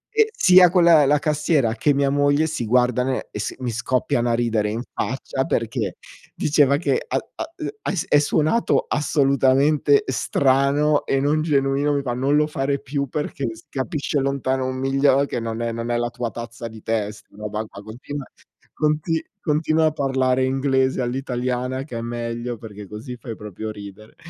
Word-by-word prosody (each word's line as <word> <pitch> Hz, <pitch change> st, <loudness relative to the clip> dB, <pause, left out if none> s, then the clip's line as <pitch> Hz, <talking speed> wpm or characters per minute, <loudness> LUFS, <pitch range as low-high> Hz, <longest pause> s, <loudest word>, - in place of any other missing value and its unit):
e 440 Hz, 0 st, +5 dB
sia 185 Hz, -, +6 dB
quella 170 Hz, -4 st, +5 dB
la 150 Hz, +2 st, +4 dB
cassiera 150 Hz, -5 st, +1 dB
che 135 Hz, +6 st, +2 dB
mia 140 Hz, 0 st, +1 dB
moglie 145 Hz, +2 st, +3 dB
si 155 Hz, -7 st, -3 dB
guardano 125 Hz, +2 st, +2 dB
e -, -, -6 dB
si 105 Hz, -, -3 dB
e -, -, -31 dB
mi 125 Hz, -, -1 dB
scoppiano 120 Hz, 0 st, 0 dB
a -, -, +2 dB
ridere 115 Hz, -3 st, 0 dB
in 110 Hz, +3 st, -3 dB
faccia 130 Hz, +1 st, -2 dB
perché 115 Hz, -4 st, -2 dB, 0.4 s
diceva 145 Hz, -2 st, +3 dB
che 455 Hz, -, 0 dB
a -, -, 0 dB, 0.2 s
a -, -, -4 dB
e 315 Hz, -, -4 dB, 0.2 s
e -, -, 0 dB, 0.2 s
è 145 Hz, -, +6 dB
suonato 155 Hz, +9 st, +1 dB
assolutamente 140 Hz, 0 st, +3 dB
strano 140 Hz, +3 st, +2 dB
e 135 Hz, -, +1 dB
non 145 Hz, +3 st, +1 dB
genuino, 140 Hz, -1 st, +1 dB
mi 140 Hz, -, -1 dB
fa: 125 Hz, -3 st, -2 dB
"Non 135 Hz, +4 st, +1 dB
lo 150 Hz, 0 st, +4 dB
fare 140 Hz, -1 st, -1 dB
più 140 Hz, +1 st, -3 dB
perché 150 Hz, -2 st, -3 dB
si 110 Hz, -, -15 dB
capisce 145 Hz, +1 st, -2 dB
lontano 135 Hz, -1 st, -1 dB
un 130 Hz, -, -3 dB
miglio 135 Hz, +1 st, +3 dB
che 140 Hz, -, -3 dB
non 115 Hz, 0 st, -4 dB
è 115 Hz, 0 st, -1 dB
non 115 Hz, +1 st, -4 dB
è 120 Hz, -, +1 dB
la 120 Hz, 0 st, -1 dB
tua 120 Hz, 0 st, -3 dB
tazza 115 Hz, 0 st, -7 dB
di 110 Hz, -1 st, -12 dB
tè 110 Hz, -2 st, -1 dB
sta 105 Hz, -1 st, -17 dB
roba 105 Hz, +1 st, -4 dB
qua, 100 Hz, -, -12 dB
continua 130 Hz, +6 st, -7 dB, 0.5 s
conti 155 Hz, +1 st, 0 dB, 0.2 s
continua 155 Hz, 0 st, +2 dB
a -, -, +1 dB
parlare 130 Hz, -3 st, +1 dB
inglese 130 Hz, 0 st, +1 dB
all'italiana, 125 Hz, 0 st, -2 dB
che 125 Hz, -5 st, -7 dB
è -, -, -3 dB
meglio, 120 Hz, +1 st, -4 dB
perché 105 Hz, -2 st, -10 dB
così 110 Hz, +5 st, -8 dB
fai 120 Hz, -2 st, -7 dB
proprio 105 Hz, +1 st, -7 dB
ridere". 105 Hz, 0 st, -11 dB
130 Hz, 180 wpm, -22 LUFS, 120-145 Hz, 0.5 s, sia